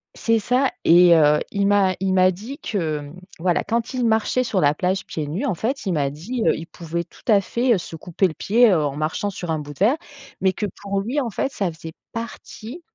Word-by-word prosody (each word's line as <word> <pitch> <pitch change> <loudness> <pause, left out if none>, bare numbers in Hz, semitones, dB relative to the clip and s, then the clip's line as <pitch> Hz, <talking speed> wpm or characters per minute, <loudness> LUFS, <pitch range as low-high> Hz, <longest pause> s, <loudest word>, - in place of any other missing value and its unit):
C'est 230 -1 +1
ça 250 +5 +1
et 175 +1 +7
heu, 150 -1 +5
il 200 0 +1
m'a 200 -2 +3
il 190 -1 0
m'a 185 0 +5
dit 220 +10 -8
que, 165 - -2
mmh, 145 +5 -10 0.2
voilà, 175 +1 +1
quand 230 +3 -2
il 250 -2 0
marchait 225 +3 +2
sur 225 -6 -1
la 145 -3 +4
plage, 185 +4 -1
pieds 155 -2 -4
nus, 180 - -3
en 265 - +1
fait, 230 - -3
il 185 - 0
m'a 145 -3 +1
dit, 215 - -4
heu, - - +4
il 165 - -7
pouvait, 170 0 -5
tout - - -20
à 210 -4 +5
fait, 235 +5 +1
heu, - - +1
se 170 - -7
couper 175 +4 0
le 165 - -6
pied, 230 +6 +4
heu, 165 -5 +2
en 140 -1 -2
marchant 155 +7 -1
sur 175 -3 -5
un 160 - -1
bout 145 0 -8
de - - -21
verre 230 +10 +3 0.4
mais 190 0 +3
que, 210 - -3 0.2
pour 200 -1 -2
lui, 245 +8 -1
en 240 - -2
fait, 270 - -2
ça 195 -8 -2
faisait 160 0 -10 0.2
partie 230 +5 -8
190 Hz, 245 wpm, -22 LUFS, 165-230 Hz, 0.4 s, et